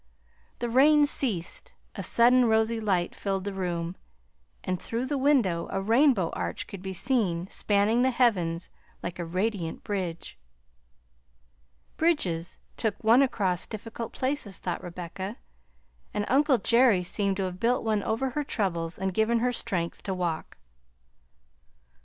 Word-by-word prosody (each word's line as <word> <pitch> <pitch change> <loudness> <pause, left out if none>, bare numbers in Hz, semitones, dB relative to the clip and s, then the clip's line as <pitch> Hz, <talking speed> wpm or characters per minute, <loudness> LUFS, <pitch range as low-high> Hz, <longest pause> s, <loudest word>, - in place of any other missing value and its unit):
The 240 - -2
rain 290 +5 +5
ceased, 225 -12 -1 0.2
a - - -5
sudden 245 +2 +4
rosy 220 0 +2
light 190 -5 0
filled 195 -1 -2
the 200 0 -4
room, 175 -2 -3 0.7
and 185 -1 -2
through 235 +2 -3
the 290 - -2
window 245 -12 +2
a 195 - -2
rainbow 225 - +3
arch 85 -1 -4
could 195 - -9
be 190 0 -5
seen 190 -5 0
spanning 210 +3 +2
the 260 - +4
heavens 185 -10 +1 0.3
like 175 0 -5
a 170 - -2
radiant 185 0 -2
bridge. 175 - -4 1.6
Bridges 185 - 0 0.2
took 220 -2 -2
one 230 +4 +6
across 195 -9 0
difficult 225 +1 -6
places, 260 -7 -3
thought 175 -2 -4
Rebecca, 180 +5 -6 0.8
and 205 - 0
uncle 275 0 +4
Jerry 230 -3 +4
seemed 195 +1 -1
to 195 - -1
have 185 -1 -4
built 240 +4 +1
one 215 -2 +1
over 240 +6 -1
her 295 +3 -2
troubles 175 - -2
and 190 -1 -2
given 220 +4 +2
her 250 +2 +1
strength 170 -7 -3
to 190 - -3
walk. 175 -3 -3
205 Hz, 140 wpm, -27 LUFS, 180-240 Hz, 1.6 s, one